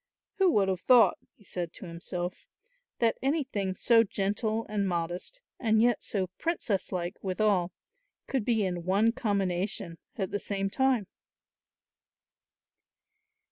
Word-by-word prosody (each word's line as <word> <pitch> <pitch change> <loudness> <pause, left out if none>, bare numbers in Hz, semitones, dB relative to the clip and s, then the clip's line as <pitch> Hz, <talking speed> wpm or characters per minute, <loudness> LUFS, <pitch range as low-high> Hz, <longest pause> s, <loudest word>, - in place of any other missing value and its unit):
"Who 380 -2 +5
would 195 -2 +3
have 185 -2 -1
thought," 245 -2 +6 0.2
he - - -22
said 175 -3 -5
to - - -10
himself, 175 +1 -5 0.5
"that 230 -1 +1
anything 260 - -1
so 230 +2 +5
gentle 215 +2 -1
and 205 -2 -1
modest 175 - -3 0.2
and 220 -3 +3
yet 240 0 +3
so 195 -3 -1
princess 285 - -1
like 180 0 -4
withal 190 -2 +1 0.5
could 265 -5 -1
be 220 -2 +2
in 175 -2 -3
one 200 +6 +3
combination 195 -7 -1 0.2
at 190 -3 -3
the 205 - -1
same 195 -1 -2
time?" 265 -4 +2
200 Hz, 130 wpm, -29 LUFS, 185-230 Hz, 0.5 s, thought